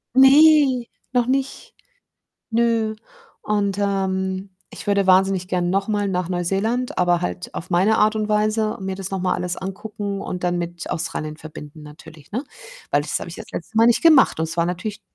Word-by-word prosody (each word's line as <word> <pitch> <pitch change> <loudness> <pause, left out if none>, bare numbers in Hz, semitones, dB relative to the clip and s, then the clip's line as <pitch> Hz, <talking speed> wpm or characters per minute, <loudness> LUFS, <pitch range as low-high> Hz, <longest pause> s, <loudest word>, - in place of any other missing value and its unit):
Ne, 270 -1 +6 0.3
noch 245 -1 +2
nicht. 270 +1 -2 0.8
Nö 230 -1 +1 0.5
und, 200 -2 -1
ähm, 190 -1 -1 0.2
ich - - -10
würde 200 -1 +2
wahnsinnig 190 -1 +3
gern 175 -1 0
noch 195 +2 0
mal 205 -2 0
nach 180 -2 -1
Neuseeland, 195 +8 -1
aber 175 -1 +2
halt 180 0 -5
auf 170 - -7
meine 190 +5 +3
Art 215 +1 +3
und 215 -1 -1
Weise, 215 0 +1
mir 190 0 -3
das 195 -1 -5
noch 195 - -2
mal 185 0 +1
alles 180 0 -3
angucken 200 +1 -5
und 180 -1 -5
dann 175 0 0
mit 175 0 -5
Australien 155 -2 -3
verbinden 155 -1 -11
natürlich, 150 0 -14
ne? 245 +6 -2 0.5
Weil, 145 - +3
das 150 - -2
habe - - -7
ich 170 - -8
ja - - -7
das - - -19
letzte 220 +6 -6
Mal 225 - +6
nicht 235 0 +4
gemacht 310 - +5
und - - +1
es 165 - -6
war 170 - +2
natürlich 185 +4 -4
195 Hz, 190 wpm, -21 LUFS, 180-220 Hz, 0.8 s, Ne